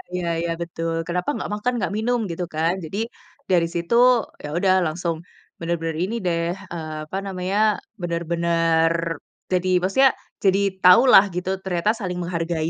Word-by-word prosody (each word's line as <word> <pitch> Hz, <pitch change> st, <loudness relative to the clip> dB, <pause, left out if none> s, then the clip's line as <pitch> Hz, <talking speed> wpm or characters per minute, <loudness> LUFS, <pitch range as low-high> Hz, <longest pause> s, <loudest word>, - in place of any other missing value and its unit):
Iya 175 Hz, -1 st, -2 dB
iya 170 Hz, 0 st, -2 dB
betul. 165 Hz, -1 st, -3 dB
Kenapa 180 Hz, +5 st, -2 dB
nggak -, -, -4 dB
makan, 245 Hz, +4 st, -1 dB
nggak 195 Hz, -, -2 dB
minum, 240 Hz, +2 st, +1 dB
gitu 175 Hz, +1 st, -3 dB
kan. 165 Hz, +2 st, +2 dB
Jadi, 160 Hz, +6 st, -6 dB, 0.5 s
dari 170 Hz, -2 st, +3 dB
situ 170 Hz, +6 st, -1 dB, 0.5 s
yaudah 175 Hz, +6 st, +1 dB
langsung 170 Hz, +1 st, -2 dB, 0.4 s
benar-benar 165 Hz, -1 st, -2 dB
ini 220 Hz, +5 st, -2 dB
deh, 170 Hz, 0 st, 0 dB, 0.2 s
eee, 155 Hz, -2 st, -5 dB
apa 190 Hz, -, -4 dB
namanya, 190 Hz, +1 st, -2 dB, 0.4 s
benar-benar, 170 Hz, -1 st, +1 dB, 0.6 s
jadi 185 Hz, 0 st, +1 dB
maksudnya, 260 Hz, +9 st, +4 dB, 0.3 s
jadi 195 Hz, 0 st, +4 dB, 0.2 s
tahu 180 Hz, +6 st, +8 dB
lah 195 Hz, -, +9 dB
gitu, 180 Hz, +1 st, -2 dB
ternyata 180 Hz, +1 st, 0 dB
saling 180 Hz, -3 st, -3 dB
menghargai 165 Hz, -2 st, -2 dB
170 Hz, 145 wpm, -22 LUFS, 165-185 Hz, 0.6 s, lah